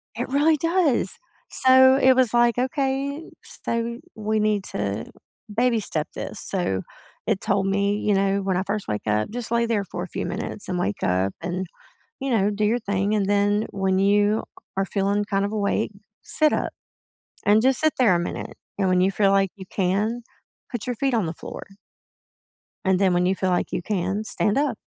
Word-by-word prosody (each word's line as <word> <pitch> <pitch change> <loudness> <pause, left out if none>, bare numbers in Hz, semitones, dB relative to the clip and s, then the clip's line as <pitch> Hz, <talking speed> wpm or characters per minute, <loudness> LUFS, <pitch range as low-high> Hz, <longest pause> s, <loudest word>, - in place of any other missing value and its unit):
It - - -3
really 295 +4 +3
does! 330 -4 +1 0.3
So, 260 0 +6
it 260 0 +6
was 255 -3 +2
like, 240 0 +4
"Okay, 275 +3 -1
so, 235 0 -3 0.2
we 215 0 -1
need 210 -2 +1
to, 100 +2 -3 0.5
baby-step 225 -10 +1
this." - - -6
So, 175 - -1 0.5
it 195 - +1
told 195 -1 +1
me, 200 +1 +1
you 210 - +1
know, 195 0 +2
when 190 -2 0
I 185 - 0
first 205 +1 -3
wake 105 0 -2
up, 105 0 +1
just 235 0 -5
lay 235 0 +2
there 225 -3 0
for 175 -1 -6
a - - -6
few - - -4
minutes 210 - -5
and 185 - -2
wake 105 - -2
up 95 +2 +1
and, 180 +2 -3 0.6
you 270 - -2
know, 205 -3 +3
do 210 +1 -2
your 230 +3 +2
thing, 200 -1 -1
and 200 -2 +1
then 205 +1 +2
when 190 -1 0
you 205 +2 +3 0.3
are 195 - +2
feeling 200 +1 0
kind 200 -1 0
of 205 - -3
awake, 210 0 0 0.3
sit 305 -1 +2
up, - - -1 0.8
and 210 +2 +5
just 260 0 +3
sit 310 -1 +2
there 230 -8 +5
a 175 - +2
minute, 175 - -5 0.2
and 195 -2 +2
when 185 0 +3
you 185 +1 +3
feel 195 0 +2
like 195 -1 +3
you 190 - -10
can, 210 +5 0 0.5
put 240 -3 -5
your 245 -1 -2
feet 270 +2 0
on 220 -6 +1
the 160 - -4
floor - - -8 1.2
and 190 0 +3
then, 190 -2 +3
when 175 0 +2
you 190 +1 +2
feel 190 0 -1
like 180 - 0
you - - -2
can, 195 +1 -1
stand 215 +1 0
up 275 -6 +1
205 Hz, 195 wpm, -24 LUFS, 190-240 Hz, 1.2 s, So